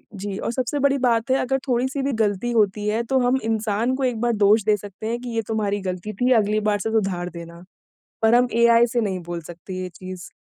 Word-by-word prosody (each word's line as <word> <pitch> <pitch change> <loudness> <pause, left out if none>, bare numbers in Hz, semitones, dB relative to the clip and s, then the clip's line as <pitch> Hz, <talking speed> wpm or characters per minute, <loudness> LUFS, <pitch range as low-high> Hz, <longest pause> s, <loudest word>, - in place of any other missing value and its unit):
जी 195 0 -5
और - - -3
सबसे 255 +3 -2
बड़ी 280 0 +3
बात 245 0 +1
है, 265 - +4
अगर 270 +1 0
थोड़ी-सी 260 +3 0
भी 275 +1 0
गलती 210 +3 0
होती 210 -2 +1
है, 220 +2 +1
तो 265 +2 +1
हम 250 +1 +2
इंसान 225 +2 0
को 270 - -3
एक 245 -3 0
बार 240 0 +2
दोष 210 +1 +4
दे 215 0 +3
सकते 205 +2 -8
हैं 235 +1 -2
कि 245 - -6
ये 225 - +1
तुम्हारी 205 -2 -1
गलती 185 +4 -5
थी, 250 +5 +1
अगली 215 -1 +2
बार 205 -1 +1
से 220 +2 -2
सुधार 190 -5 -1
देना, 170 0 -10 0.6
पर 225 +1 +5
हम 245 0 +4
एआई 235 0 +6
से 240 - +1
नहीं 195 -4 -1
बोल 170 -1 -3
सकते 175 +2 -9
ये 185 - -4
चीज़। 185 0 -9
220 Hz, 235 wpm, -23 LUFS, 200-245 Hz, 0.6 s, एआई